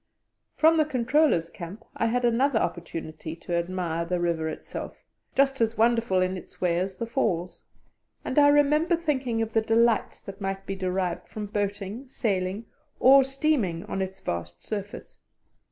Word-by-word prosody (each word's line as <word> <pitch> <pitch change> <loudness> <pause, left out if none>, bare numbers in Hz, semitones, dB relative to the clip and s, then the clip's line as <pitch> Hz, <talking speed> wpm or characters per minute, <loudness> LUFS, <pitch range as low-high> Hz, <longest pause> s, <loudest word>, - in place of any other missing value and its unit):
From 325 +1 +5
the 310 - +4
Controller's 255 - +2
Camp 190 +6 -9
I 230 - +1
had 245 +2 +1
another 240 +2 +3
opportunity 165 -4 -4
to 170 +1 -7
admire 170 -1 -1
the 175 +1 -1
river 165 -2 0
itself, - - -7 0.3
just 270 -2 +2
as 230 0 +1
wonderful 230 -4 +3
in 185 +1 0
its - - -13
way 175 -1 +1
as 190 +1 -3
the 230 - -2
Falls, 185 -8 -2 0.6
and 260 - +2
I 285 - +7
remember 300 +4 +4
thinking 260 -8 -1
of 225 0 -6
the 225 - +3
delights 225 0 +2
that 195 +1 -10
might 195 0 -3
be 195 - -3
derived 185 -1 -2
from 215 -1 -6
boating, 205 +4 -3
sailing, 200 -3 -2 0.3
or 270 +2 +7
steaming, 270 - 0
on 200 -2 -3
its 190 0 -4
vast 85 0 -5
surface. 205 -1 -6
210 Hz, 160 wpm, -26 LUFS, 180-255 Hz, 0.6 s, I